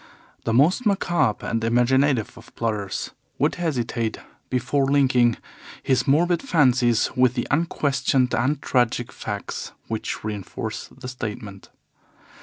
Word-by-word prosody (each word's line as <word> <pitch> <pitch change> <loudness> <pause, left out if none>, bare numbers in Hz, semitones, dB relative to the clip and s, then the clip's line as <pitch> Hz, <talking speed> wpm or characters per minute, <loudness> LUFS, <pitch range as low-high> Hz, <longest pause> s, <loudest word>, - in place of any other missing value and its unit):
The - - 0
most 155 - +4
macabre 175 - +1
and 115 -1 -1
imaginative 125 +1 +2
of 115 -1 -16
plotters 105 -4 -2 0.3
would - - +2
hesitate 120 -8 -1 0.3
before 130 +2 +1
linking 130 -5 +3 0.5
his 130 -2 +1
morbid 170 +5 +3
fancies 130 - +3
with 125 -1 +3
the 120 - -2
unquestioned 135 -4 +1
and 135 +5 +1
tragic 120 -1 +1
facts - - -5 0.2
which 110 -1 -3
reinforce 105 -3 -5
the 135 -1 -11
statement. 105 -5 -7
125 Hz, 115 wpm, -23 LUFS, 115-140 Hz, 0.5 s, most